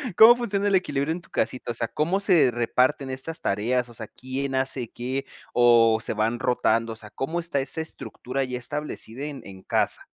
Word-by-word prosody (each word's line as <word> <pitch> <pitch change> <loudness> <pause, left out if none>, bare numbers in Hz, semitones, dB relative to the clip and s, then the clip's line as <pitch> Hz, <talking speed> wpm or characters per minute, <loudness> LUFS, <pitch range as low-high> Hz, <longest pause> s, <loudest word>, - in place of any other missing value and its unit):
¿Cómo 225 +4 +9
funciona 205 -4 -1
el 200 - +3
equilibrio 145 -5 0
en 175 - -6
tu - - -20
casita?, 125 -1 -2
o - - -4
sea, 115 0 -2
¿cómo 170 - 0
se 180 - +4
reparten 125 +4 +1
estas 130 +5 -5
tareas?, 120 +5 0
o - - -13
sea, 110 -1 -8
¿quién 135 +3 -4
hace 130 -3 -1
qué 130 +3 -3 0.3
o 115 -2 +5
se - - -3
van 110 +2 0
rotando?, 115 -2 +1
o - - -10
sea, 110 -1 -8
¿cómo 135 +10 -3
está 170 -4 -1
esa 140 +4 -2
estructura 135 -4 -4
ya 125 -1 -3
establecida 135 -1 -5
en 145 -2 -6
en 95 -1 -11
casa? - - 0
130 Hz, 200 wpm, -25 LUFS, 120-150 Hz, 0.3 s, Cómo